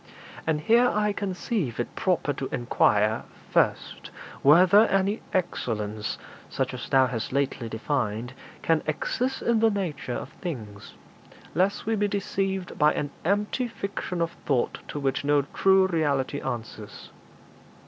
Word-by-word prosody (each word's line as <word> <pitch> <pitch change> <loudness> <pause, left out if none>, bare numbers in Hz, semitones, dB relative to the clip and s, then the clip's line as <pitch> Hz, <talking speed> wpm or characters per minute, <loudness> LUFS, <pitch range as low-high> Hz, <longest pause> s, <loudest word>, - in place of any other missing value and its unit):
And 155 -2 +1
here 235 +8 +5
I 210 0 +1
conceive 190 - -2
it 120 - -3
proper 175 -6 +1
to 135 0 -4
inquire, 110 -3 +2 0.3
first, - - 0 0.3
whether 185 +9 +7
any 195 +3 +1
excellence, 110 - -2 0.3
such - - -2
as - - -6
thou 130 -1 +5
hast 120 -3 -3
lately 135 -3 -1
defined, 115 0 -2 0.3
can 165 -1 +2
exist 250 - -1
in 235 -1 +2
the 225 0 +5
nature 175 - -3
of - - -5
things, 110 - -7 0.6
lest 195 +3 +1
we 225 +1 +1
be 205 -1 +1
deceived 195 -2 -2
by 150 0 +4
an 145 -1 -2
empty 205 - 0
fiction 200 -5 -3
of 165 - -2 0.2
thought 130 -4 +1
to 145 - -5
which 135 -1 -1
no 145 0 +3
true 190 +6 +3
reality 145 -6 0
answers. 110 -3 -6
155 Hz, 140 wpm, -26 LUFS, 130-200 Hz, 0.6 s, whether